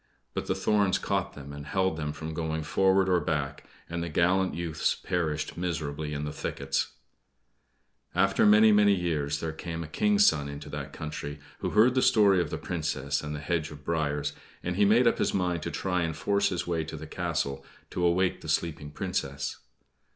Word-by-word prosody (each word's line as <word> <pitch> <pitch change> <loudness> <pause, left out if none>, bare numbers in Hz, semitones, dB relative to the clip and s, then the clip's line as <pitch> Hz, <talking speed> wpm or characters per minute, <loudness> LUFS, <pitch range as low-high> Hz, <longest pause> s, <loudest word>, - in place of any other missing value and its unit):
But - - -3
the - - +1
thorns 100 -3 +2
caught - - -1
them, 70 0 -9
and 70 0 -7
held 95 -1 +1
them 75 -2 -3
from 80 +1 -6
going 80 -1 -2
forward 95 +4 +3
or 90 -1 +4
back, 75 -2 -2 0.2
and 85 0 -3
the 85 - -3
gallant 90 +4 +2
youths 85 -2 0
perished 80 -4 -2
miserably 75 -4 -3
in 75 0 -3
the 75 - -3
thickets. - - -2 1.2
After 95 +2 +3
many, 105 +1 +7
many 105 -1 +5
years 75 -5 -1
there 80 - -2
came 85 +1 -5
a - - -7
King's 210 - +3
son 70 - +3
into 70 0 -8
that 70 -1 -5
country, 75 -1 -6 0.2
who - - -1
heard 115 +4 +5
the 130 - +2
story 100 -6 +5
of 85 - -2
the - - -3
Princess 75 -4 -2
and 75 0 -4
the - - -5
hedge 80 0 -1
of 75 -1 -11
briers; 75 -3 -1 0.3
and 90 0 -2
he 100 +2 +4
made 115 +5 +5
up 115 - +3
his - - +1
mind 90 -3 0
to - - -3
try 90 -2 -1
and 80 -2 -2
force 100 +3 +2
his 90 - -2
way 85 -2 -1
to 80 - -7
the - - -7
castle 70 0 -2 0.3
to 90 - -2
awake 90 +2 +2
the - - -7
sleeping 75 -3 -1
Princess. 70 -1 -3
80 Hz, 195 wpm, -28 LUFS, 75-95 Hz, 1.2 s, many